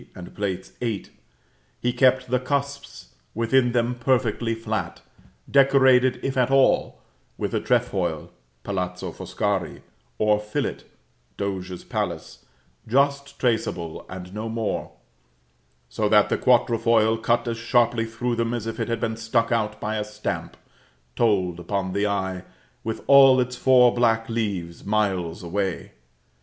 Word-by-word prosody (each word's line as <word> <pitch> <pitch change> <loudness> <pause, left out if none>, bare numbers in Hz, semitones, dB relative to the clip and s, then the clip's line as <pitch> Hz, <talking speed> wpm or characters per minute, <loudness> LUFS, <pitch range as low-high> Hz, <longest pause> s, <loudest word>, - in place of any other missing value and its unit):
and 90 -1 -9
VIII., 100 +2 -4 0.7
he 120 0 0
kept 130 -1 +3
the 125 - +3
cusps 140 +2 -4 0.3
within 120 +2 +2
them 120 0 +1
perfectly 120 -2 0
flat, 115 - -4 0.5
decorated, 130 -2 +4
if 135 0 -2
at 125 -1 +2
all, 135 0 +2 0.3
with - - -3
a - - +1
trefoil - - -1 0.3
(Palazzo 90 -2 -3
Foscari), 100 -5 -3 0.3
or 105 -1 +3
fillet 105 0 -4 0.5
(Doge's 95 -2 -4
Palace) - - -4 0.4
just 140 +3 +1
traceable 100 -9 -1
and 90 0 -8
no 110 +2 -4
more, 110 -1 -3 1.0
so 105 -1 -1
that 105 -1 +5
the - - +1
quatrefoil, 115 -2 +3
cut 120 +1 +1
as 115 -1 -3
sharply 120 0 +2
through 120 +2 -2
them 115 +1 -1
as 115 -3 -4
if 115 - -5
it - - -1
had 115 -1 -2
been 110 0 -2
struck 115 +1 0
out 105 -2 -1
by 110 +1 -2
a 105 - -1
stamp, 105 0 -5 0.6
told 95 -6 +1
upon 95 0 -3
the 100 +1 +1
eye, 95 -2 -2 0.4
with 110 0 -4
all 135 -2 +7
its 125 0 -1
four 125 -1 +5
black 115 -2 +2
leaves, 100 -7 -3
miles 95 -5 -1
away. 95 +1 -3
115 Hz, 135 wpm, -24 LUFS, 100-125 Hz, 1.0 s, all